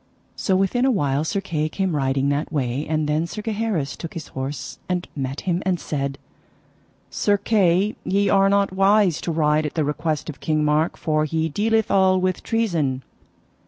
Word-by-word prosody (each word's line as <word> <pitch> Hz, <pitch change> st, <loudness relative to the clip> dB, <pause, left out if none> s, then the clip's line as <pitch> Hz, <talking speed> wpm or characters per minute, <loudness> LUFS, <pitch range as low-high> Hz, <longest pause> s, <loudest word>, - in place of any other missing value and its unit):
So 190 Hz, -, 0 dB
within 195 Hz, +6 st, +1 dB
a 265 Hz, -, +4 dB
while 145 Hz, -, +1 dB
Sir 195 Hz, +5 st, -1 dB
Kay 155 Hz, -5 st, -2 dB
came 190 Hz, 0 st, -1 dB
riding 135 Hz, 0 st, +1 dB
that 145 Hz, +2 st, -1 dB
way, 135 Hz, -2 st, -1 dB
and 155 Hz, -1 st, 0 dB
then 155 Hz, +3 st, 0 dB
Sir 210 Hz, +5 st, -6 dB
Gaheris 210 Hz, -, -2 dB
took 165 Hz, -, -8 dB
his 160 Hz, -3 st, -7 dB
horse 135 Hz, +1 st, -5 dB
and 180 Hz, -1 st, -1 dB
met 135 Hz, 0 st, -3 dB
him, 180 Hz, -1 st, -1 dB
and 185 Hz, -2 st, 0 dB
said: 140 Hz, -3 st, -3 dB, 0.9 s
Sir 205 Hz, 0 st, +2 dB
Kay, 200 Hz, -1 st, +2 dB
ye 200 Hz, +1 st, +1 dB
are 195 Hz, 0 st, +4 dB
not 200 Hz, -1 st, +2 dB
wise 195 Hz, -2 st, +3 dB
to 170 Hz, -, -2 dB
ride 155 Hz, -1 st, +2 dB
at -, -, -8 dB
the 160 Hz, -, +1 dB
request 150 Hz, +1 st, -2 dB
of 155 Hz, -, -7 dB
King 155 Hz, -1 st, 0 dB
Mark, 150 Hz, +2 st, +1 dB
for 155 Hz, -1 st, 0 dB
he 160 Hz, +1 st, -1 dB
dealeth 220 Hz, +6 st, +1 dB
all 190 Hz, -1 st, +4 dB
with 185 Hz, -1 st, -1 dB
treason. 165 Hz, -, 0 dB
165 Hz, 185 wpm, -22 LUFS, 150-195 Hz, 0.9 s, a